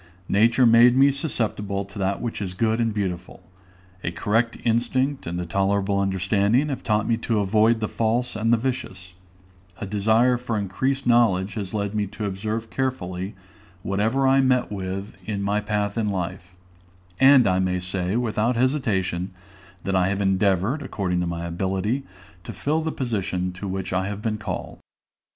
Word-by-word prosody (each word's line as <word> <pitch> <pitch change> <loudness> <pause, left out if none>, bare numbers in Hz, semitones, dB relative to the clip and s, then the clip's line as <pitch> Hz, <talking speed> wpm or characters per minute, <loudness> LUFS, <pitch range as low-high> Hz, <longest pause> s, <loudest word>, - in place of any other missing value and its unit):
Nature 115 +5 +4
made 120 +2 +6
me 140 +1 +6
susceptible 105 -8 -2
to 100 +1 -10
that 95 +2 -1
which 115 -3 -3
is 95 -2 -4
good 110 +3 +1
and 115 -1 +1
beautiful; 95 -3 -4 0.6
a - - -1
correct 110 +7 0
instinct 130 +3 0
and 85 +1 -3
a 90 - -3
tolerable 100 +2 +1
understanding 100 +7 +1
have 135 - -3
taught 105 -1 0
me 115 - +2
to 115 -1 -1
avoid 110 +3 +3
the 110 - -1
false 115 +3 -1
and 110 +1 +1
the 120 - +5
vicious; 110 -7 -4 0.7
a - - -4
desire 110 +5 +3
for 120 -2 -3
increased 130 +8 -1
knowledge 105 -5 +3
has 100 -3 -5
led 100 -1 -2
me 105 -1 -1
to 105 +3 -6
observe 110 +3 -3
carefully 95 -7 -3 0.5
whatever 110 +8 +1
I 135 +1 +5
met 130 -3 +2
with 95 0 -5
in 100 -2 -2
my 100 +1 +1
path 105 0 -1
in 110 - 0
life; 90 -1 -4 0.6
and 135 -2 +7
I 95 -1 +2
may 95 -1 0
say, 90 +1 -2
without 120 0 0
hesitation, 110 -9 0 0.5
that 95 - -2
I 90 -1 +3
have 100 0 -1
endeavored, 100 - +1
according 95 -9 -2
to 90 - -1
my 85 0 -4
ability, 95 +8 -1 0.4
to - - -7
fill 155 +3 -1
the 160 0 -2
position 95 -9 -2
to 100 +2 -6
which 95 -1 -3
I 95 +1 0
have 105 +1 -5
been 110 -1 -1
called. - - -5
105 Hz, 170 wpm, -24 LUFS, 95-120 Hz, 0.7 s, and